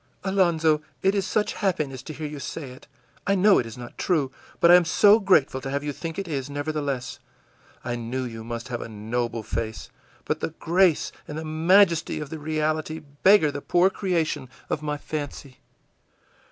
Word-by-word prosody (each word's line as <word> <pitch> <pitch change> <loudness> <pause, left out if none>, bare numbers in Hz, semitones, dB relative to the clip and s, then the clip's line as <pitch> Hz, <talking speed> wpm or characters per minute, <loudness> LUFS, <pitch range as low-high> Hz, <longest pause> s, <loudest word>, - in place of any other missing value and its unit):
î 190 - -1
ìAlonzo, 165 -5 +3 0.2
it 195 - +4
is 200 -2 0
such 215 +1 0
happiness 155 - -1
to 155 - -8
hear 155 0 -6
you 150 -1 -6
say 140 -1 -6
it. 130 - -14 0.4
I 200 - +3
know 195 +1 +5
it 120 - -2
is 115 - -9
not 120 -1 -10
true, 150 -8 +1 0.3
but 170 - +6
I - - +10
am 180 - +6
so 205 +6 +5
grateful 155 -10 +3
to 135 - -5
have 140 +1 -2
you 145 -1 -3
think 165 +2 -6
it 195 - -3
is, 140 -4 -3
nevertheless! 145 -3 -3 0.6
I 120 0 -2
knew 120 +3 -3
you 115 -2 -6
must 115 +2 -6
have 120 -1 -3
a - - -6
noble 115 +2 -3
face, 110 -2 -4 0.3
but - - -1
the 160 - -4
grace 175 -1 +2 0.2
and 155 +1 -5
majesty 185 -4 +5
of 150 -2 -7
the 160 - -5
reality 155 +1 -1 0.2
beggar 190 -6 +6
the 145 - -6
poor 180 +5 +3
creation 160 -9 -1 0.2
of 150 - -1
my 150 -1 -2
fancy. 145 -3 -6
150 Hz, 190 wpm, -25 LUFS, 130-170 Hz, 0.6 s, I